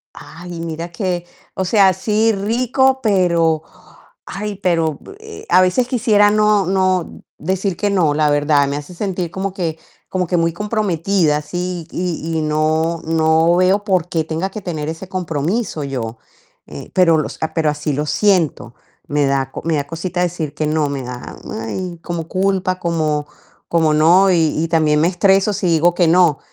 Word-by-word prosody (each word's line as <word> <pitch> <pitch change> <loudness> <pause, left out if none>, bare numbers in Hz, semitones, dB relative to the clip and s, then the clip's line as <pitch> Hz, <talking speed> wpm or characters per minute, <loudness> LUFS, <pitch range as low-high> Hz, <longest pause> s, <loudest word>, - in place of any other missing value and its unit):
Ay, 170 +1 -9
mira 165 +1 -5
que, 175 -1 -3 0.3
o 190 - -2
sea, 195 -1 +4
sí 215 +4 +1
rico, 250 +6 +1
pero, 170 -7 +2 0.6
ay, 205 0 -5
pero, 165 -5 0 0.2
eh, 440 0 -11
a 185 - +5
veces 185 +7 +2
quisiera 215 -5 +3
no 210 -2 +3
no 185 -2 0 0.2
decir 190 +2 -2
que 205 -1 0
no, 170 -7 +2
la 150 0 +2
verdad, 145 -1 +3
me 140 - -2
hace 150 +5 -8
sentir 180 -3 -3
como 190 +1 -3
que 165 -4 -3 0.3
como 185 -1 -1
que 175 - 0
muy 165 -1 +1
comprometida, 195 -5 0
así 175 +3 -4
y 165 -2 -3
y - - -1
no 155 +2 0
no 160 +1 +3
veo 190 +3 +2
por 185 -4 +1
qué 160 -3 -1
tenga 165 +5 -3
que 215 - -7
tener 160 -5 -4
ese 165 +3 -6
compromiso 175 0 -2
yo. 120 -4 -4 0.5
Eh, - - -10
pero 170 -3 +4
los, 155 - -3
ah, 160 - -3
pero 155 -2 +2
así 150 0 -3
lo 145 +2 -1
siento, 175 - +1 0.3
me 145 -1 +1
da 135 -1 0
co - - -7
me 165 -1 +1
da 140 - -2
cosita 175 +4 -4
decir 165 -4 -3
que 155 0 -2
no, 150 -1 +1
me 140 -2 -4
da, 125 0 -8 0.3
ay, 175 +9 -5
como 170 -2 -4
culpa, 185 -1 -1
como 155 -3 -1 0.4
como 160 -2 +2
no. 175 +5 +5
Y 160 -2 +1
y - - 0
también 155 -2 +2
me 165 - +3
estreso 195 +2 +3
si 185 -2 -1
digo 170 +1 +3
que 175 -2 +2
no, 170 -3 +4
170 Hz, 175 wpm, -18 LUFS, 155-190 Hz, 0.6 s, a